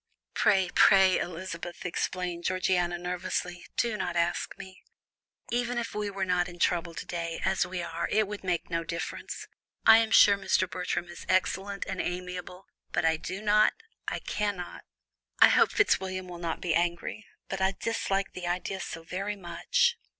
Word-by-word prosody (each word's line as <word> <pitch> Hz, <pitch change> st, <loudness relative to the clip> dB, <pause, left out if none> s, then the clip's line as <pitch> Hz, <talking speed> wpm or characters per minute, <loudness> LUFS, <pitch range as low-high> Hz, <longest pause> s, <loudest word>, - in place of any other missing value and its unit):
"Pray, 190 Hz, -3 st, +3 dB
pray, 190 Hz, -1 st, +6 dB
Elizabeth," 175 Hz, 0 st, -6 dB
exclaimed 180 Hz, 0 st, -2 dB
Georgiana, 180 Hz, -1 st, +1 dB
nervously, 180 Hz, 0 st, -3 dB
"do 235 Hz, -2 st, +1 dB
not 180 Hz, -4 st, -3 dB
ask 170 Hz, 0 st, 0 dB
me. 190 Hz, 0 st, -11 dB, 0.7 s
Even 240 Hz, 0 st, 0 dB
if 235 Hz, -, -3 dB
we 210 Hz, -1 st, -2 dB
were 195 Hz, -1 st, -2 dB
not 180 Hz, -1 st, +1 dB
in 175 Hz, -, -11 dB
trouble 170 Hz, -1 st, 0 dB
to -, -, -6 dB
day, 170 Hz, -1 st, -4 dB
as 190 Hz, -1 st, +2 dB
we 180 Hz, -1 st, -4 dB
are, 170 Hz, 0 st, -3 dB
it 215 Hz, -1 st, +2 dB
would 210 Hz, 0 st, -6 dB
make 180 Hz, -3 st, -1 dB
no 165 Hz, -1 st, -1 dB
difference. 170 Hz, +1 st, -5 dB, 0.4 s
I 225 Hz, -, +9 dB
am 225 Hz, -1 st, +1 dB
sure 205 Hz, -2 st, +7 dB
Mr. 185 Hz, -1 st, +2 dB
Bertram 180 Hz, -1 st, -3 dB
is 175 Hz, -, -10 dB
excellent 195 Hz, +1 st, 0 dB
and 190 Hz, -1 st, -3 dB
amiable, 180 Hz, +1 st, -5 dB, 0.3 s
but -, -, 0 dB
I 160 Hz, 0 st, +3 dB
do 190 Hz, +5 st, -6 dB
not 210 Hz, 0 st, +5 dB, 0.3 s
I -, -, -1 dB
cannot 205 Hz, -4 st, -3 dB, 0.5 s
I -, -, +8 dB
hope -, -, +4 dB
Fitzwilliam 185 Hz, -1 st, +1 dB
will 175 Hz, -1 st, -8 dB
not 170 Hz, -1 st, -3 dB
be 175 Hz, -3 st, 0 dB
angry, 175 Hz, +6 st, -1 dB, 0.2 s
but 190 Hz, 0 st, -4 dB
I 190 Hz, +1 st, +2 dB
dislike 195 Hz, -4 st, -1 dB
the 180 Hz, -1 st, -5 dB
idea 180 Hz, +2 st, -2 dB
so 165 Hz, -2 st, -6 dB
very 195 Hz, +5 st, -3 dB
much." 470 Hz, -, +1 dB
180 Hz, 170 wpm, -29 LUFS, 175-195 Hz, 0.7 s, I